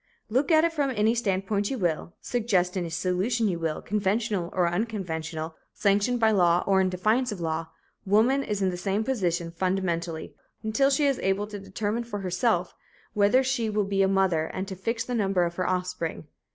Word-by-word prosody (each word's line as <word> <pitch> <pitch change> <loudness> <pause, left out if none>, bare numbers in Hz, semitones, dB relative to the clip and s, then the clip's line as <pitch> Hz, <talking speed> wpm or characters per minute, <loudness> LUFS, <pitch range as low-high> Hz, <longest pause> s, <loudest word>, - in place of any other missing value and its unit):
Look 265 +8 +1
at 315 0 +6
it 335 0 +1
from 290 -3 0
any 220 -2 +2
standpoint 200 -2 0
you 270 - -2
will, 170 -3 -1
suggest 200 -7 0
any 175 -3 -2
solution 185 +7 0
you 175 -4 -1
will, 160 -2 -2
conventional 205 -2 0
or 180 -2 +2
unconventional, 170 -5 -3 0.2
sanctioned 205 +4 +2
by 220 -1 +4
law 175 -4 +3
or 190 -1 +3
in 185 - +2
defiance 215 +7 +1
of 205 - -5
law, 165 -1 -2 0.4
woman 220 +7 +3
is 205 -4 -2
in 190 - +2
the 180 - -5
same 195 +4 -1
position, 175 -9 -1
fundamentally, 170 -2 -2 0.3
until 245 +6 +2
she 285 +1 +2
is 275 -2 +2
able 195 +2 0
to 210 -1 -7
determine 205 +4 -3
for 210 -4 -5
herself 185 0 0 0.4
whether 210 +6 +4
she 255 -4 0
will 210 0 +1
be 195 0 0
a 195 - +4
mother 190 -5 +2
and 190 +4 -5
to 190 - -5
fix 225 +5 -2
the 245 - -5
number 195 -5 +2
of 170 0 -1
her 185 -1 0
offspring. 180 -3 -2
195 Hz, 190 wpm, -26 LUFS, 180-225 Hz, 0.4 s, at